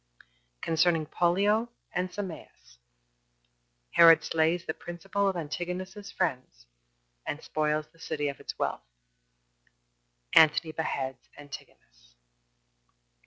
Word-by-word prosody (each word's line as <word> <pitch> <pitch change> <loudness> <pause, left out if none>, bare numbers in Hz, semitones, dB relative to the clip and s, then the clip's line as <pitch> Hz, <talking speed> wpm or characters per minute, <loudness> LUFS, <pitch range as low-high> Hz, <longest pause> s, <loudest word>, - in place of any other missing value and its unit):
Concerning 165 -1 +2
Pollio 200 +8 +2 0.2
And 180 +1 -1
Sameas. 180 - -8 1.1
Herod 165 -1 +8
Slays 165 +2 +1
The 160 - -2
Principal 195 +5 -2
Of 190 - -2
Antigonus's 180 +5 -5
Friends, 130 - -3 0.6
And 150 - -5
Spoils 155 0 0
The 165 - -24
City 150 -2 -2
Of 140 - -4
Its - - -7
Wealth. - - -1 1.5
Antony 155 +1 +6
Beheads 135 -5 -3
Antigonus. - - -13
160 Hz, 95 wpm, -29 LUFS, 145-180 Hz, 1.5 s, Herod